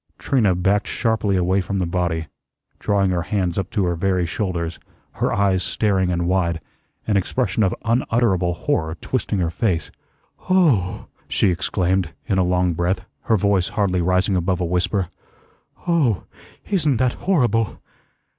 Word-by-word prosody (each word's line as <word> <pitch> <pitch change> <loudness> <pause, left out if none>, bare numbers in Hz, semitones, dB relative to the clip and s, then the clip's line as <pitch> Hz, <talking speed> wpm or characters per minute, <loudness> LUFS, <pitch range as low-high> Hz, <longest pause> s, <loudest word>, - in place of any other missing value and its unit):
Trina 110 -9 +2
backed 95 +3 +1
sharply 110 -4 0
away 95 +2 +2
from 100 +2 -3
the 95 - 0
body, 85 -2 -1 0.5
drawing 100 -2 +1
her 90 -1 0
hands 90 -1 -1
up 95 -1 -2
to 100 -4 0
her 85 - +1
very 90 +1 +1
shoulders, 85 -3 -3 0.4
her - - +2
eyes 100 -2 +2
staring 95 -2 +1
and 85 -1 0
wide, 85 -2 +1 0.5
an 105 -2 +2
expression 110 +2 0
of 95 -3 +2
unutterable 115 -7 +1
horror 80 0 -1
twisting 110 +2 -2
her 85 -3 0
face. 85 - -1 0.6
"Oh 145 - +2
h - - -32 0.2
h!" - - -26
she - - +4
exclaimed 90 0 0
in 95 -5 +1
a - - +4
long 90 0 +1
breath, 90 +3 -1 0.2
her 110 - +3
voice 100 -2 +2
hardly 95 -5 0
rising 90 +3 +2
above 90 0 0
a 90 - 0
whisper. 90 +2 0 0.8
"Oh 145 - +2 0.4
h, - - -8
isn't 155 - +2
that 125 +1 +2 0.2
horrible!" 115 - +2
95 Hz, 160 wpm, -21 LUFS, 90-105 Hz, 0.8 s, she